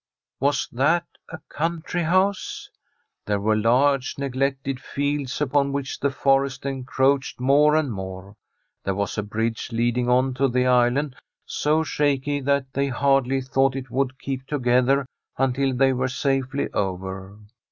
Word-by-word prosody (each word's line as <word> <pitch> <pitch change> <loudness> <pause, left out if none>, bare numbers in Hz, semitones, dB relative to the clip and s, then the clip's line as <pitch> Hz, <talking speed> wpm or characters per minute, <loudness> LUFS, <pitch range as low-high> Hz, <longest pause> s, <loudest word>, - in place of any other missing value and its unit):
Was 140 +2 +1
that 155 +8 +2 0.2
a - - -7
country 170 +2 -2
house? 185 +4 0 0.6
There 105 -1 +1
were 110 +2 +2
large 130 +5 +2
neglected 135 0 -2
fields, 140 -1 -2
upon 140 -1 +1
which 140 -1 -3
the 140 - +1
forest 135 0 +1
encroached 135 0 0
more 145 +4 +4
and 155 -5 +1
more. 95 +1 -7 0.5
There 95 - -1
was 100 +1 -2
a - - +1
bridge 110 +3 -3
leading 120 +1 0
on 130 +1 +3
to 135 +2 +2
the 125 0 +1
island, 125 +3 +2 0.3
so 155 +2 +1
shaky 145 -2 0
that 135 -1 0
they 140 0 0
Jiardly 135 0 +1
thought 135 0 +2
it 130 -2 -6
would 130 +1 -1
keep 135 -1 -5
together 130 0 +2 0.3
until 135 +1 +1
they 135 +1 +3
were 130 +1 0
safely 135 +1 -1
over. 95 0 -4
135 Hz, 140 wpm, -23 LUFS, 125-140 Hz, 0.6 s, more